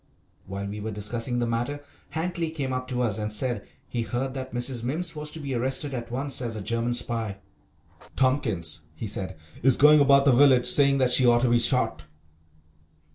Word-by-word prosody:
While 100 +1 -5
we 100 +1 -6
were 110 +1 -4
discussing 115 +4 -3
the 120 - 0
matter 120 +5 -2 0.3
Hankly 170 0 -2
came 140 -5 -3
up 130 0 -3
to 125 -1 -1
us 110 -3 -1
and 105 0 -3
said 110 0 -1 0.2
he 120 - -3
heard 120 +4 -3
that 130 -1 -6
Mrs. 120 0 -2
Mimms 160 +7 -3
was 150 0 -3
to 160 - -6
be 140 -3 -4
arrested 130 +3 -1
at 120 -2 -5
once 135 +2 -1
as 115 -2 -3
a 110 - -5
German 115 +3 -1
spy. 115 -4 -2 0.8
"Tompkins," 110 - 0
he 80 - -6
said, 95 -3 -2 0.2
"is 130 +1 +4
going 150 +1 +7
about 140 -1 +5
the 140 - +6
village 130 -1 +5
saying 140 +2 +4
that 130 -2 +2
she 125 0 +4
ought 120 0 +5
to 125 -1 +2
be 120 - +4
shot." 125 - +2
125 Hz, 195 wpm, -26 LUFS, 115-135 Hz, 0.8 s, going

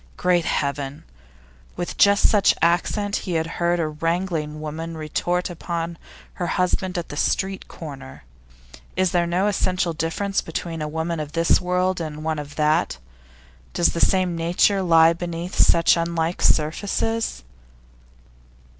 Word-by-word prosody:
Great 175 -2 +2
Heaven! 140 0 -2 0.7
With 175 - -4
just 200 0 +5
such 205 -2 +4
accent 200 +4 +1
he 180 - -4
had 160 -1 +1 0.2
heard 175 0 +2
a 160 - 0
wrangling 165 -1 -2
woman 160 +2 -5
retort 175 +3 -1
upon 170 -1 -4 0.3
her 175 - -3
husband 180 +1 0
at 175 - -4
the - - -6
street 190 +5 -1
corner. 135 - -10 0.7
Is 185 -2 +2
there 175 -1 +2
then - - -5
no 180 +3 +1
essential 185 -3 0
difference 165 +5 -1
between 165 0 -5
a 150 - -2
woman 160 +2 -3
of 150 -1 -5
this 165 0 +3
world 180 0 0
and 155 -1 -5
one 160 -1 -1
of 145 -1 -8
that? 155 - +1 0.8
Does 170 - +2
the 170 - -2
same 185 -3 +2
nature 175 +4 +2
lie 165 -2 +5
beneath 170 +1 -5
such 165 - +5
unlike 170 0 -1
surfaces? 200 - 0
170 Hz, 145 wpm, -23 LUFS, 160-180 Hz, 0.8 s, just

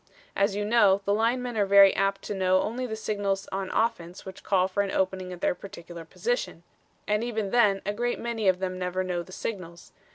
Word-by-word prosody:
As 200 0 +1
you 205 0 -1
know, 205 -3 +4
the 200 - +2
linemen 240 +3 0
are 205 - +3
very 200 0 +7
apt 195 0 0
to - - -4
know 185 -1 +2
only 250 +3 -3
the 220 - -4
signals 200 -3 -2
on 190 -1 -3
offense 180 -6 -2
which 190 - -9
call 185 -2 +2
for 195 +2 0
an 200 - -2
opening 185 -1 -1
at 175 -1 -9
their - - +2
particular 170 -2 -10
position. 485 - -3 0.4
And 210 +1 +1
even 220 -4 -2
then 205 -5 +3
a 205 - -1
great 240 +3 -1
many 230 -3 -2
of 185 -1 +4
them 185 0 -4
never 180 +1 -2
know 180 -1 -2
the 185 - -12
signals. 180 -4 -6
195 Hz, 215 wpm, -27 LUFS, 185-215 Hz, 0.4 s, very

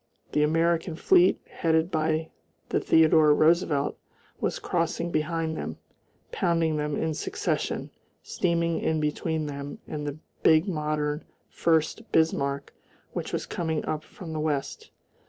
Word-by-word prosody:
The 150 - +2
American 165 +2 +2
fleet, 360 - +4
headed 160 +1 0
by 160 0 0 0.4
the - - +1
Theodore 155 -2 +5
Roosevelt, 155 -3 +2 0.4
was - - -1
crossing 170 0 -1
behind 160 0 -1
them, - - -5 0.5
pounding 165 -4 +1
them 150 -1 -1
in 160 -1 -1
succession, - - -2 0.3
steaming 170 -1 0
in 160 -1 0
between 155 +1 -1
them 140 -1 -6
and 150 -1 -4
the 145 +1 -4 0.2
big 160 +4 +5
modern 150 -3 -1 0.3
Furst 160 +4 +1
Bismarck, 140 -3 +1 0.4
which - - -4
was - - -2
coming 160 -3 -2
up 155 0 -2
from 165 -1 -9
the 155 - -2
west. 150 -3 -2
160 Hz, 130 wpm, -27 LUFS, 150-165 Hz, 0.5 s, Theodore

